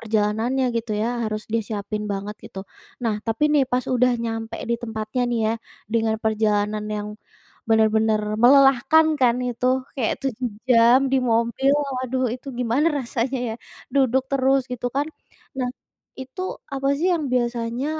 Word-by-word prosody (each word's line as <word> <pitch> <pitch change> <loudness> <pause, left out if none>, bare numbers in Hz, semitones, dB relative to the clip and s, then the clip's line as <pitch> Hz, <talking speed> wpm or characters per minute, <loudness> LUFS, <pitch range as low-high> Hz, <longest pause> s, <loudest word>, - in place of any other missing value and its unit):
perjalanannya 220 +4 0
gitu 230 -1 -2
ya 225 - 0 0.2
harus 215 0 -4
disiapin 210 -1 -3
banget 200 +2 -5
gitu. 190 - -10 0.5
Nah 225 -2 +1
tapi 225 +4 -2
nih 290 -3 +4
pas 250 0 +1
udah 250 0 +3
nyampe 225 0 -4
di - - +3
tempatnya 220 +1 -3
nih 240 - 0
ya 220 - +1 0.4
dengan 225 -1 +2
perjalanan 210 -1 +1
yang 210 0 -4 0.6
benar-benar 220 -1 +3 0.2
melelahkan 275 +4 +6
kan 245 -1 +4
itu 245 +1 -2 0.3
kayak 235 -4 0
7 255 -1 -2 0.2
jam 235 +1 +6
di - - +4
mobil 235 +4 +2 0.3
waduh 255 0 -1
itu 255 +2 -10
gimana 250 +6 +1
rasanya 255 +1 -2
ya, 220 - -3 0.4
duduk 265 -1 +3
terus 270 0 +3
gitu 245 0 -3
kan. 285 - +2 0.5
Nah 250 - 0 0.5
itu 260 +8 -7 0.3
apa 275 0 -1
sih 360 +3 +1
yang 315 -3 -2
biasanya 240 +1 -1
235 Hz, 145 wpm, -23 LUFS, 220-260 Hz, 0.6 s, melelahkan